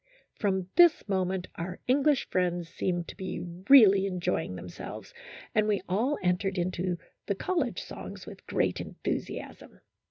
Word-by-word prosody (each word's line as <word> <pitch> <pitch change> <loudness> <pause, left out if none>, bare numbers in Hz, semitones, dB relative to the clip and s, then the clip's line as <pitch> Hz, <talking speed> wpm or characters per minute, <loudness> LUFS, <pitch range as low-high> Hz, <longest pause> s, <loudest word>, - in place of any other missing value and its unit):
From 190 -4 0
this 345 -8 +6
moment 190 -2 -1
our 180 +2 -5
English 280 +2 +3
friends 175 -2 0
seemed 175 -1 -2
to - - -8
be 185 -1 -5 0.3
really 200 -8 +8
enjoying 180 - -2
themselves, 90 -1 -8 0.4
and 215 0 +3
we 205 -3 +1
all 235 +10 +1
entered 185 +2 +1
into 180 0 -1 0.3
the 200 - 0
college 305 - -1
songs - - -8
with - - -12
great - - 0
enthusiasm. - - -5
190 Hz, 135 wpm, -29 LUFS, 180-215 Hz, 0.4 s, really